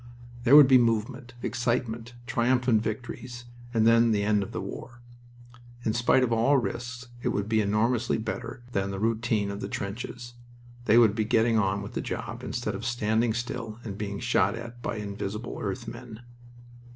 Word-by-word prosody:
There 130 Hz, +4 st, +7 dB
would 150 Hz, -2 st, +10 dB
be 130 Hz, -1 st, +7 dB
movement, 120 Hz, +2 st, -1 dB
excitement, 120 Hz, 0 st, -2 dB
triumphant 120 Hz, -1 st, +2 dB
victories 120 Hz, +2 st, -5 dB, 0.3 s
and 110 Hz, -2 st, +2 dB
then 115 Hz, +1 st, +5 dB
the 100 Hz, -1 st, +1 dB
end 105 Hz, 0 st, +2 dB
of 100 Hz, +3 st, -5 dB
the -, -, -4 dB
war. 120 Hz, 0 st, -8 dB, 0.9 s
In 110 Hz, -, +1 dB
spite 120 Hz, +2 st, +3 dB
of 120 Hz, -2 st, +1 dB
all 120 Hz, +5 st, +4 dB
risks 120 Hz, 0 st, -4 dB
it -, -, -2 dB
would 100 Hz, -4 st, -1 dB
be 110 Hz, 0 st, +2 dB
enormously 110 Hz, +4 st, +1 dB
better 115 Hz, +2 st, -5 dB
than 100 Hz, -3 st, -1 dB
the 95 Hz, -, -4 dB
routine 110 Hz, -2 st, 0 dB
of 100 Hz, -, -6 dB
the -, -, -4 dB
trenches. 120 Hz, +4 st, -5 dB, 0.5 s
They 110 Hz, -, +5 dB
would 115 Hz, -4 st, +6 dB
be 110 Hz, 0 st, 0 dB
getting 115 Hz, +1 st, +3 dB
on 100 Hz, 0 st, 0 dB
with 100 Hz, -, -8 dB
the -, -, -2 dB
job -, -, -5 dB
instead -, -, -3 dB
of -, -, -6 dB
standing 115 Hz, -1 st, +1 dB
still 115 Hz, -2 st, -4 dB
and 105 Hz, -4 st, -5 dB
being 100 Hz, -1 st, -4 dB
shot 115 Hz, -4 st, +2 dB
at 120 Hz, +1 st, -9 dB
by -, -, -3 dB
invisible 105 Hz, +1 st, -5 dB
earth -, -, -4 dB
men. 110 Hz, +2 st, -9 dB
115 Hz, 175 wpm, -27 LUFS, 105-120 Hz, 0.9 s, would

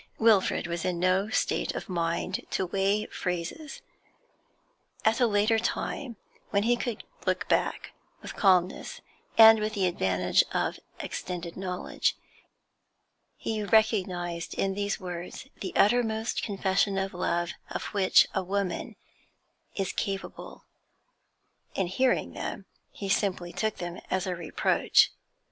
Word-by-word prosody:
Wilfrid 220 Hz, -6 st, +3 dB
was 170 Hz, -1 st, -3 dB
in 180 Hz, -2 st, -1 dB
no 185 Hz, +3 st, +2 dB
state -, -, 0 dB
of -, -, -5 dB
mind 170 Hz, 0 st, -1 dB
to 190 Hz, -, 0 dB
weigh 195 Hz, +3 st, +1 dB
phrases; 195 Hz, -, -5 dB, 1.2 s
at 220 Hz, +1 st, +3 dB
a 245 Hz, -, +5 dB
later 215 Hz, +1 st, +3 dB
time, 240 Hz, +2 st, -3 dB, 0.3 s
when 200 Hz, -1 st, +1 dB
he 240 Hz, +2 st, +3 dB
could 240 Hz, -2 st, -4 dB, 0.2 s
look -, -, 0 dB
back -, -, 0 dB, 0.3 s
with -, -, -7 dB
calmness, 185 Hz, -3 st, +2 dB, 0.4 s
and 225 Hz, 0 st, +10 dB
with 215 Hz, +1 st, -2 dB
the 195 Hz, -2 st, +1 dB
advantage 95 Hz, -, +2 dB
of -, -, -1 dB, 0.2 s
extended 175 Hz, -2 st, -5 dB
knowledge, 180 Hz, -1 st, -1 dB, 1.2 s
he 220 Hz, -1 st, -2 dB
recognised 185 Hz, -6 st, +1 dB
in 195 Hz, 0 st, 0 dB
these 200 Hz, +1 st, -2 dB
words 180 Hz, +6 st, -7 dB
the 190 Hz, -, -4 dB
uttermost 220 Hz, 0 st, +2 dB
confession 195 Hz, -1 st, 0 dB
of 195 Hz, 0 st, -2 dB
love 175 Hz, -1 st, -1 dB, 0.2 s
of -, -, -4 dB
'which 195 Hz, -2 st, +5 dB
a 190 Hz, -, +1 dB
woman 190 Hz, 0 st, -2 dB, 0.8 s
is 195 Hz, -2 st, -2 dB
capable. 195 Hz, -1 st, -5 dB, 1.1 s
In 190 Hz, -, +1 dB
hearing 250 Hz, +9 st, +1 dB
them, -, -, -5 dB, 0.3 s
he 200 Hz, -, -6 dB
simply 185 Hz, -3 st, 0 dB
took 220 Hz, -1 st, -1 dB
them 175 Hz, 0 st, -6 dB
as 185 Hz, -1 st, 0 dB
a 185 Hz, -1 st, -2 dB
reproach. 170 Hz, -2 st, +3 dB
195 Hz, 125 wpm, -28 LUFS, 180-215 Hz, 1.2 s, and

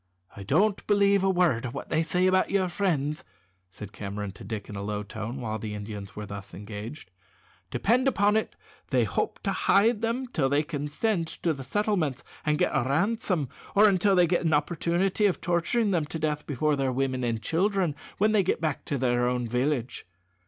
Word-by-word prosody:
"I 100 Hz, -, -8 dB
don't 190 Hz, -, +1 dB
believe 200 Hz, -1 st, +4 dB
a 195 Hz, -, +3 dB
word 175 Hz, -11 st, +2 dB
of 125 Hz, 0 st, -5 dB
what -, -, -6 dB
they 160 Hz, -, +2 dB
say 180 Hz, +3 st, +1 dB
about 185 Hz, 0 st, +3 dB
your 190 Hz, -2 st, +1 dB
friends," 155 Hz, -6 st, -1 dB, 0.5 s
said 100 Hz, +2 st, -10 dB
Cameron 100 Hz, 0 st, -5 dB
to 100 Hz, -, -13 dB
Dick 110 Hz, -3 st, -5 dB
in 105 Hz, -, -8 dB
a 100 Hz, -, -4 dB
low 105 Hz, 0 st, -3 dB
tone 110 Hz, +4 st, -6 dB
while 110 Hz, -3 st, -3 dB
the 105 Hz, 0 st, -5 dB
Indians 105 Hz, -1 st, -7 dB
were 105 Hz, -, -5 dB
thus 100 Hz, -1 st, -8 dB
engaged. 105 Hz, +3 st, -8 dB, 0.6 s
"Depend 235 Hz, -, +2 dB
upon 210 Hz, -5 st, +3 dB
it 220 Hz, -, -1 dB, 0.3 s
they -, -, +2 dB
hope -, -, -1 dB
to -, -, 0 dB
hide 215 Hz, +2 st, +3 dB
them 230 Hz, +3 st, -1 dB
till 155 Hz, -, 0 dB
they 145 Hz, +2 st, +2 dB
can 145 Hz, -1 st, -4 dB
send 170 Hz, +2 st, 0 dB
to 165 Hz, +1 st, -1 dB
the 135 Hz, -2 st, -7 dB
settlements 175 Hz, -, 0 dB, 0.2 s
and 150 Hz, 0 st, +1 dB
get 180 Hz, -, +2 dB
a -, -, +3 dB
ransom, 175 Hz, -, 0 dB, 0.3 s
or 210 Hz, +1 st, +7 dB
till 195 Hz, +1 st, +3 dB
they 180 Hz, -1 st, +6 dB
get 175 Hz, +1 st, +1 dB
an 160 Hz, -2 st, +3 dB
opportunity 175 Hz, +6 st, +1 dB
of 190 Hz, -, -1 dB
torturing 175 Hz, +6 st, +1 dB
them 170 Hz, -5 st, +1 dB
to 160 Hz, -, -4 dB
death 150 Hz, -1 st, -2 dB
before 150 Hz, +2 st, +1 dB
their 135 Hz, -2 st, 0 dB
women 130 Hz, 0 st, -1 dB
and 115 Hz, -2 st, -1 dB
children 180 Hz, -, +1 dB, 0.2 s
when 215 Hz, +2 st, +3 dB
they 215 Hz, -2 st, +4 dB
get 190 Hz, -, 0 dB
back 155 Hz, -4 st, -2 dB
to 140 Hz, -, -2 dB
their 120 Hz, -1 st, +1 dB
own 125 Hz, -1 st, -1 dB
village. 125 Hz, 0 st, -1 dB
155 Hz, 200 wpm, -27 LUFS, 120-190 Hz, 0.6 s, or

